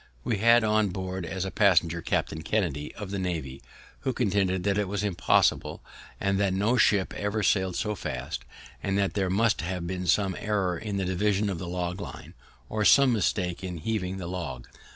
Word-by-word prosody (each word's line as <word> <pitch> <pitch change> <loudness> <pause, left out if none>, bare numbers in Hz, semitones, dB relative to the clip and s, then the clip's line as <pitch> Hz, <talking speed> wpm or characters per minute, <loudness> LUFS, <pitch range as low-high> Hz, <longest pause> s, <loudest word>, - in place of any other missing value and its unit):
We 110 - 0
had 115 +2 +6
on 110 -1 +2
board, 95 -1 -4
as 95 0 -3
a 95 - -4
passenger, 85 -5 +3
Captain 80 -1 -1
Kennedy, 80 -6 -1
of 100 -2 -7
the 100 - -2
Navy, 80 -8 -3 0.4
who 130 -2 -2
contended 95 -5 +1
that 100 +1 +1
it 105 - 0
was 100 +1 -2
impossible, 90 -7 +2 0.4
and 100 0 +1
that 100 -2 +2
no 105 +6 +2
ship 105 -5 +3
ever 105 +1 -2
sailed 95 -3 +2
so 105 - -1
fast, 100 - -5 0.4
and 100 0 0
that 100 -1 +1
there 95 -2 0
must 110 +4 +2
have 90 0 -3
been 90 +1 -4
some 95 -2 +2
error 100 -4 0
in 100 +3 -4
the 95 - -1
division 100 +2 +1
of 85 - -4
the 90 - -5
log 90 +1 -3
line, - - -9 0.3
or 110 0 -1
some 130 +5 +6
mistake 95 -4 -1
in 90 -2 -4
heaving 95 +1 -2
the 95 - -5
log. 85 -8 -5
95 Hz, 195 wpm, -27 LUFS, 90-105 Hz, 0.4 s, had